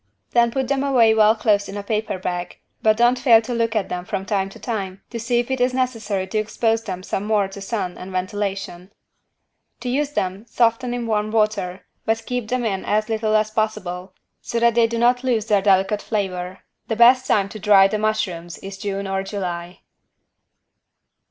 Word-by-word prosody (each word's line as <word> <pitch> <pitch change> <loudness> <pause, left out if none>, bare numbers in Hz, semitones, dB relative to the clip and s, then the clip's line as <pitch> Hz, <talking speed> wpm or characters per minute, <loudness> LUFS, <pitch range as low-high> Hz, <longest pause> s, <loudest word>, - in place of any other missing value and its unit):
Then 235 -1 +4
put 265 +2 -2
them 275 +1 0
away 245 -5 +4
well 220 0 +5
closed 210 -2 +1
in 200 - -6
a 205 - -5
paper 215 -1 -2
bag, 175 -1 -4 0.2
but 215 -1 +3
don't 240 +1 +3
fail 240 -3 +6
to 245 +2 -4
look 230 -1 0
at 215 - 0
them 180 0 -3
from 190 +1 -4
time 195 -1 -1
to - - -13
time 195 -5 -5
to 235 - -4
see 240 +2 0
if 240 +2 -1
it 260 -1 -1
is 250 0 +2
necessary 220 -7 -1
to 200 +3 -2
expose 225 +1 0
them 185 -4 -6
some 190 - -3
more 210 -2 +1
to 195 +1 -9
sun 195 -3 -3
and 185 +1 -8
ventilation. 190 -1 -4 0.9
To 250 - -3
use 290 +3 -1
them 190 +2 -3
soften 240 +1 +1
in 240 -1 -3
warm 215 -1 0
water, 210 -4 0 0.2
but 225 0 -1
keep 245 -3 -3
them 250 +1 -1
in 195 -4 -1
as 215 +1 0
little 220 -1 0
as 215 0 +2
possible, 190 -4 -3 0.3
so 235 - -2
that 235 0 +4
they 230 0 +4
do 230 0 -3
not 245 +2 +3
lose 235 -5 +1
their 210 -3 +2
delicate 195 +1 +2
flavor. 185 -4 -3 0.3
The 225 - -1
best 250 +3 +6
time 200 -2 +2
to 215 - -8
dry 200 -1 +6
the 210 +2 -2
mushrooms 185 -6 -2
is 195 0 -9
June 200 -1 -3
or 195 0 -1
July. 180 -3 -5
215 Hz, 200 wpm, -21 LUFS, 195-235 Hz, 0.9 s, fail